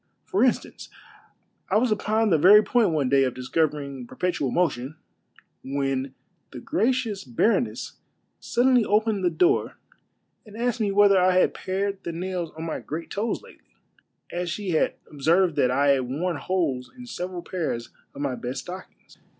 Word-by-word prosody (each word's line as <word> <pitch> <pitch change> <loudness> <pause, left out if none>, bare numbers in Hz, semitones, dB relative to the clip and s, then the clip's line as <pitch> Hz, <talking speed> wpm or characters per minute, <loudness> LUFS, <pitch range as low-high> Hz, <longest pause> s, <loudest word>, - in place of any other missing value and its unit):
For 195 - 0
instanee, 250 -1 0 0.8
I 200 - +3
was 235 +1 +2
upon 215 +1 +1
the 160 - +4
very 205 +6 +8
point 230 -2 +2
one 150 -5 0
day 135 +1 +4
of 130 -2 -1
discovering 140 -1 -2
per - - -13
petual 175 -8 -1
motion, 150 -5 -1 0.7
when 135 -1 -2 0.3
the 125 - -9
gracious 225 - 0
baroness 130 - 0 0.4
suddenly 245 0 +3
opened 210 -1 +1
the 180 - +3
door 365 - +1 0.7
and 215 -1 -13
asked 240 0 -1
me 205 -2 +1
whether 200 -1 +5
I 185 0 +4
had - - +3
pared 195 +1 -3
the 170 - -4
nails 180 0 -3
of 160 - -5
my 165 - -3
great 160 +3 -6
toes 215 +3 -2
lately, - - -19 0.6
as 175 0 -3
she 195 +1 -3
had 160 - +1 0.2
obs.erved 165 +4 +2
that 125 - +3
I 140 +3 +2
had 130 -3 +2
worn 165 +5 -2
holes 145 -9 -2
in 250 - -9
several 180 -6 -5
pairs 160 -11 -4 0.2
of 140 - -7
my 140 -3 -1
best 125 +1 -5
stockings. 185 +1 -11
180 Hz, 165 wpm, -25 LUFS, 140-205 Hz, 0.8 s, very